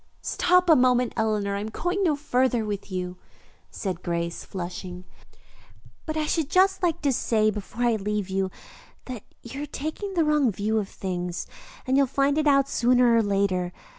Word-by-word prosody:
"Stop 360 0 +3
a 320 - +7
moment, 250 -2 +3
Eleanor. 210 -3 0
I - - -2
am 210 +2 -4
going 355 - -1
no 320 -5 +3
farther 255 -5 +1
with 205 -1 -5
you," 180 -1 -4 0.5
said 185 -3 -4
Grace, 170 -1 -3
flushing, 180 0 -6 1.0
"but 310 0 -2
I 310 - 0
should 310 -1 0
just 380 +2 +3
like 340 -4 0
to 280 -2 +2
say 215 -2 +2
before 215 +3 -5
I 235 -2 +3
leave 210 -1 -2
you 190 0 -1 0.6
that 250 -5 -6 0.2
you 265 +4 -7
are 295 - -4
taking 315 +8 -5
the 335 - +3
wrong 300 -5 +3
view 215 +3 0
of 200 -2 -4
things, 180 -2 -4 0.4
and 265 +1 +2
you'll 275 -1 +4
find 280 +3 +1
it 305 - +1
out 275 -1 +4
sooner 245 -2 +3
or 230 - +5
later. 195 -3 0
235 Hz, 180 wpm, -25 LUFS, 195-285 Hz, 1.0 s, a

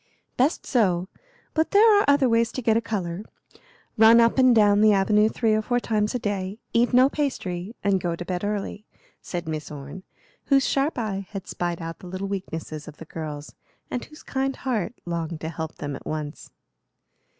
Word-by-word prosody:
"Best 270 +6 +1
so; 190 -7 +1 0.4
but 315 0 +1
there 425 +1 +6
are - - +3
other 285 -2 +4
ways 230 0 +2
to 255 - -3
get 225 -1 +3
a 230 - +3
color. 190 -6 -3 0.8
Run 225 +1 +8
up 230 +3 +4
and 255 -2 +6
down 205 -1 +5
the 215 -1 +6
avenue 210 +2 +3
three 225 -1 +1
or 215 - +2
four 245 +3 0
times 215 -1 0
a - - +3
day, 200 -3 -3 0.2
eat 235 +1 +3
no 255 +1 +6
pastry, 220 -9 -3
and 195 -2 +2
go 170 -1 -1
to 175 - -7
bed 180 +1 -3
early," 205 0 -3 0.4
said 175 -2 -5
Miss 155 -1 -4
Orne, 145 +4 -8 0.4
whose 275 -1 +3
sharp 280 +2 0
eye 200 -5 -3
had 195 -3 -6
spied 175 -1 -3
out 165 0 -6
the 180 - -11
little 185 +2 -4
weaknesses 165 -6 -5
of 155 - -10
the 165 - -10
girls, 150 -2 -7 0.4
and 245 - -2
whose 305 - -15
kind 270 0 -2
heart 240 -4 -2
longed 170 -2 -3
to 160 - -3
help 160 -1 -5
them 145 -1 -5
at - - -10
once. 155 -1 -5
205 Hz, 195 wpm, -25 LUFS, 175-240 Hz, 0.8 s, Run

